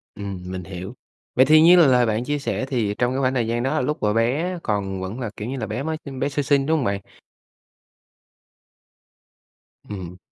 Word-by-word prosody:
Ừm, 100 -3 -6
mình 90 0 -5
hiểu. 95 +3 -7 0.4
Vậy 130 - +6
thì 155 +3 +6
như 170 +3 +8
là 170 -4 +7
lời 125 -2 +4
bạn 110 +1 0
chia 145 +3 -2
sẻ 140 -1 -2
thì 120 -6 -1
trong 125 +1 +1
cái 135 - -1
khoảng 130 -1 +1
thời 120 -4 0
gian 120 +1 -1
đó 150 +4 0
lúc 150 +5 -1
mà 105 0 +2
bé 140 +11 0
còn 100 -3 -2
vẫn 95 +6 -5
là, 120 -4 -3
kiểu 105 - -6
như 135 +2 -4
là, - - -3
bé 120 +5 -3
mới 160 +1 -2
sinh 135 -2 -7
bé 140 - 0
sơ 145 +1 -1
sinh, 140 0 +2
đúng 160 +2 +2
hông 140 - -1
bạn? 100 -1 -1 2.9
Ừm. 90 -3 -7
125 Hz, 215 wpm, -23 LUFS, 105-140 Hz, 2.9 s, như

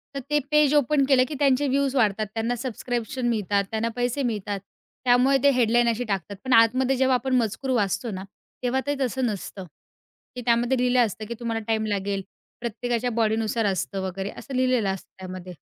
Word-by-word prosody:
तर - - -1
ते 295 0 +3
page 300 -1 +4
open 290 0 +3
केलं, 260 -2 +6
की 300 - -5
त्यांचे 280 0 +3
व्ह्यूज 275 0 +1
वाढतात, 215 -3 +2
त्यांना 230 +2 -1
सबस्क्रिप्शन 245 0 -3
मिळतात, 205 -3 +1
त्यांना 225 +1 -1
पैसे 245 +3 -1
मिळतात. 205 -4 -2 0.5
त्यामुळे 250 +2 +5
ते 285 - +7
हेडलाईन 240 -1 +3
अशी 230 +1 -1
टाकतात. 200 -2 -3
पण 260 -1 +1
आतमध्ये 250 +4 +4
जेव्हा 260 0 +3
आपण 255 +1 0
मजकूर 230 +3 -1
वाचतो 215 +1 0
ना, 190 0 -5 0.4
तेव्हा 255 +2 +1
ते 285 - +1
तसं 260 0 0
नसतं, 200 -3 -4 0.7
की 250 - -5
त्यामध्ये 240 +2 +2
लिहिलं 250 0 +3
असतं, 215 0 -6
की 235 - -4
तुम्हाला 230 -2 -2
टाईम 220 -1 +1
लागेल. 200 -1 -1 0.4
प्रत्येकाच्या 240 +1 -2
बॉडीनुसार 220 0 0
असतं 195 +1 -3
वगैरे 190 +2 -4
असं 270 - -7
लिहिलेलं 255 -5 +2
असतं 190 -1 -5
त्यामध्ये. 185 -1 -8
235 Hz, 180 wpm, -25 LUFS, 215-255 Hz, 0.7 s, ते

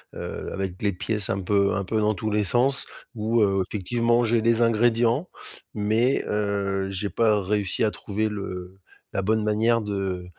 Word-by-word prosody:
heu, - - -6
avec 95 -2 -4
les 100 - +2
pièces 100 +2 -2
un 95 - 0
peu 100 +1 +2
un 100 - -1
peu 110 +4 -1
dans 105 0 +2
tous 110 +3 -3
les 105 0 +2
sens. 130 +6 +2 0.3
Où, 115 0 +1
heu, 95 -2 +2
effectivement, 120 +4 +1
j'ai 115 0 +2
les 115 +1 +3
ingrédients 115 +6 +2 0.5
mais 110 +5 +1
heu, 100 -2 -1
j'ai 95 +1 -3
pas 110 -3 +2
réussi 100 +1 0
à 110 - +2
trouver 105 +1 -2
le 95 -2 -6 0.3
la - - 0
bonne 110 +2 +1
manière 110 +2 +2
de 95 -3 -3
105 Hz, 175 wpm, -25 LUFS, 100-115 Hz, 0.5 s, les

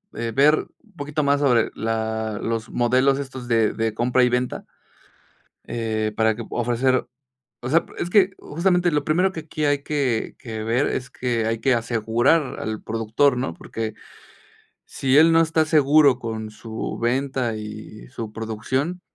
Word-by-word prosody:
eh, 115 0 -3
ver 145 +3 +6 0.3
un 215 -4 -26
poquito 150 +1 -2
más 140 0 +2
sobre 125 -5 +3
la 110 -1 -2
los 115 0 -3
modelos 130 +3 +2
estos 130 -3 -7
de 115 -3 +2
de 110 -1 -1
compra 125 +3 +2
y 125 - +4
venta, 125 +1 -2 1.0
eh, 110 -2 -2
para 110 0 +3
que 115 - -6
pue 115 - -5
ofrecer 125 +2 +1 0.5
o 125 - -4
sea, 165 +4 +3
es 175 - -3
que, 195 -1 +5
justamente, 175 +2 +1
lo 150 -2 0
primero 180 +6 +2
que 170 - -6
aquí 155 -1 -3
hay 145 -1 +1
que 135 -7 -1
que 110 -3 -6
ver 120 +5 +1
es 125 0 -3
que 120 -3 -2
hay 115 0 -1
que 135 +2 +2
asegurar 120 +5 +1
al 110 -1 -4
productor, 115 +4 +1
¿no?, 125 -9 -2
porque 110 +5 -5 0.9
si 135 0 +1
él 160 +2 +7
no 165 0 +5
está 160 -1 +2
seguro 150 -3 +4
con 110 -2 -5
su 110 +1 -6
venta 130 -1 -1
y 105 - -9
su 110 - -6
producción, 120 +10 -3
125 Hz, 165 wpm, -23 LUFS, 115-145 Hz, 1.0 s, él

